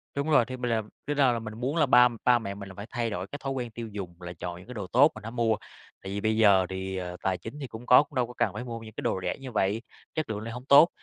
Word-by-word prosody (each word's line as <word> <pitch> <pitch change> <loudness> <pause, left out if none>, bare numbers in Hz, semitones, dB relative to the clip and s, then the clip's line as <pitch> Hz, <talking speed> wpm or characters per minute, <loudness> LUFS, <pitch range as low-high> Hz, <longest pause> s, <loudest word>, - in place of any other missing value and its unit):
Đúng 140 +3 -1
rồi. 145 -6 +5
Thì 130 +1 -6
mình 125 -1 -2
làm 110 -2 -1 0.2
bây 145 - 0
giờ 135 -3 +4
là 115 - -1
mình 110 -1 -7
muốn 135 +5 -1
là 155 -3 +4
ba 125 -2 +7 0.2
ba 125 -1 +5
mẹ 100 -3 -5
mình 100 -1 -8
là 95 - -11
phải 100 - -7
thay 120 -2 -1
đổi 95 -2 -4
cái 145 - -7
thói 135 - -2
quen 125 -3 -4
tiêu 115 0 -6
dùng, 90 -4 -7
là 85 0 -6
chọn 85 -1 -5
những 90 +5 -14
cái 125 - -7
đồ 100 -5 -5
tốt 135 - +5
mình 110 - -10
hãy 115 - -6
mua, 115 -2 +2 0.5
tại 95 - -6
vì 100 +1 -3
bây 110 +1 +1
giờ 100 -4 +6
thì, 95 0 -4
ờ, 90 -1 -5
tài 95 -1 +1
chính 115 +11 -9
thì 135 - -5
cũng 110 +1 -9
có, 125 +4 +8
cũng 145 -1 -18
đâu 125 -2 +1
có 125 - -10
cần - - +1
phải - - -5
mua 115 -2 -5
những 110 -1 -11
cái - - -6
đồ - - 0
rẻ - - -2
như 135 -2 -8
vậy, 105 +3 +1 0.3
chất 155 -6 -2
lượng 105 - -2
lại 115 +2 -6
hông 125 +2 -8
tốt. 145 +5 +8
115 Hz, 330 wpm, -28 LUFS, 100-125 Hz, 0.5 s, có